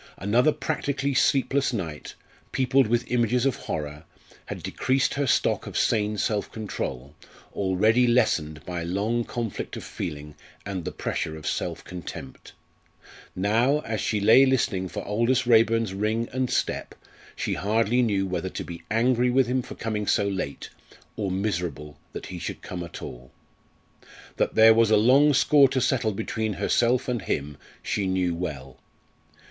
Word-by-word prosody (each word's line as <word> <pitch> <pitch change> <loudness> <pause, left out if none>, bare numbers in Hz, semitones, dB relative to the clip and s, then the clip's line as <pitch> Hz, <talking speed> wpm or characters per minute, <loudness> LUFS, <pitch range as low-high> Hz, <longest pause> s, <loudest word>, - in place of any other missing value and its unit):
Another 120 +9 +3
practically 140 -2 -2
sleepless 135 +1 +2
night, 85 -10 -5 0.4
peopled 130 -1 +3
with 120 +2 0
images 120 +1 +2
of 135 - +2
horror, 75 0 -5 0.4
had - - -6
decreased 130 +1 0
her 140 -1 -1
stock - - +1
of - - -4
sane 105 -1 +1
self 105 0 -1
control, 70 - -5 0.4
already 105 +6 +2
lessened 80 - +1
by 90 -1 -4
long 100 +8 -1
conflict 115 -2 -5
of - - -7
feeling 75 0 -6 0.3
and 95 -4 -4
the - - -3
pressure 80 0 -3
of 75 - -11
self - - -3
contempt. 85 -6 -9 0.8
Now, 115 +10 +2
as 110 -5 -3
she 105 - 0
lay 110 +6 +7
listening 115 -8 +1
for - - -6
Aldous 120 +5 +1
Raeburn's 115 -3 +3
ring 110 +4 -1
and 130 -1 0
step, - - -2 0.4
she - - -2
hardly 115 +4 +1
knew 100 -5 +1
whether 95 -1 -3
to - - -5
be 85 -1 -8
angry 120 +2 +2
with 130 +1 +3
him 125 +2 0
for - - -10
coming 105 -2 -3
so 100 - +2
late, 95 -8 -4 0.4
or 100 -3 -2
miserable 90 -7 -3
that - - -7
he 90 - -7
should 85 - -6
come 90 -1 -5
at 85 - -9
all. 60 +1 -9 1.1
That - - 0
there 110 0 +8
was 115 -1 +4
a 110 - +5
long 135 +7 +5
score 140 0 +5
to 130 - 0
settle 125 -3 +1
between 110 +1 -2
herself 120 +6 +1
and 120 -3 -1
him 75 -4 -3 0.3
she 100 -2 -1
knew 95 -2 0
well. 70 -7 -6
110 Hz, 155 wpm, -25 LUFS, 90-125 Hz, 1.1 s, there